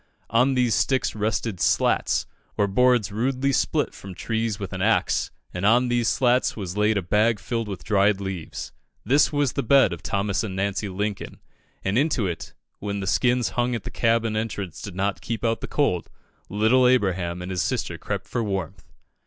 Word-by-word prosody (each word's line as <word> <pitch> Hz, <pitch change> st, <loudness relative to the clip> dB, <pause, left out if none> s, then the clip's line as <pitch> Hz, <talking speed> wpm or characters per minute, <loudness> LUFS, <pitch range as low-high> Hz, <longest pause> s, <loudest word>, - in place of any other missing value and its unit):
On 125 Hz, +4 st, +3 dB
these 125 Hz, -3 st, +2 dB
sticks 130 Hz, -1 st, +1 dB
rested 105 Hz, -2 st, -2 dB
"slats," -, -, +2 dB, 0.3 s
or 105 Hz, -, +3 dB
boards 120 Hz, +1 st, +3 dB
rudely 130 Hz, +5 st, 0 dB
split -, -, 0 dB
from 95 Hz, -2 st, -10 dB
trees 110 Hz, +1 st, -2 dB
with 100 Hz, -1 st, -6 dB
an 95 Hz, -, -4 dB
axe, 110 Hz, +3 st, +2 dB, 0.2 s
and 90 Hz, -, -4 dB
on 120 Hz, +4 st, +4 dB
these 120 Hz, -1 st, +1 dB
slats 125 Hz, 0 st, +2 dB
was 95 Hz, -3 st, -5 dB
laid 105 Hz, +1 st, +2 dB
a 100 Hz, -, -1 dB
bag 105 Hz, +5 st, +2 dB
filled 115 Hz, +3 st, -3 dB
with 100 Hz, -3 st, -6 dB
dried 100 Hz, -1 st, +2 dB
leaves. 95 Hz, -5 st, -5 dB, 0.3 s
This 145 Hz, +3 st, +4 dB
was 145 Hz, -4 st, +1 dB
the -, -, -1 dB
bed 130 Hz, -5 st, +4 dB
of 85 Hz, -, -8 dB
Thomas 100 Hz, -1 st, -1 dB
and 100 Hz, -4 st, -4 dB
Nancy 100 Hz, +1 st, -1 dB
Lincoln, 100 Hz, +2 st, -4 dB, 0.4 s
and 100 Hz, +5 st, +1 dB
into 145 Hz, -7 st, +1 dB
it 85 Hz, -3 st, -5 dB, 0.2 s
when 100 Hz, 0 st, -3 dB
the 95 Hz, -, -4 dB
skins 125 Hz, +5 st, +2 dB
hung 120 Hz, 0 st, 0 dB
at 115 Hz, -, -5 dB
the -, -, -6 dB
cabin 115 Hz, -1 st, +1 dB
entrance 105 Hz, -6 st, -4 dB
did 100 Hz, -4 st, -7 dB
not 100 Hz, +1 st, -1 dB
keep 115 Hz, 0 st, -3 dB
out 115 Hz, 0 st, 0 dB
the -, -, -4 dB
cold 140 Hz, -, 0 dB, 0.4 s
little 110 Hz, +5 st, +4 dB
Abraham 95 Hz, -8 st, +1 dB
and 90 Hz, -, -5 dB
his 90 Hz, -, -1 dB
sister -, -, -2 dB
crept -, -, -4 dB
for 120 Hz, -, -2 dB
warmth. 95 Hz, -6 st, -4 dB
105 Hz, 185 wpm, -24 LUFS, 95-120 Hz, 0.4 s, on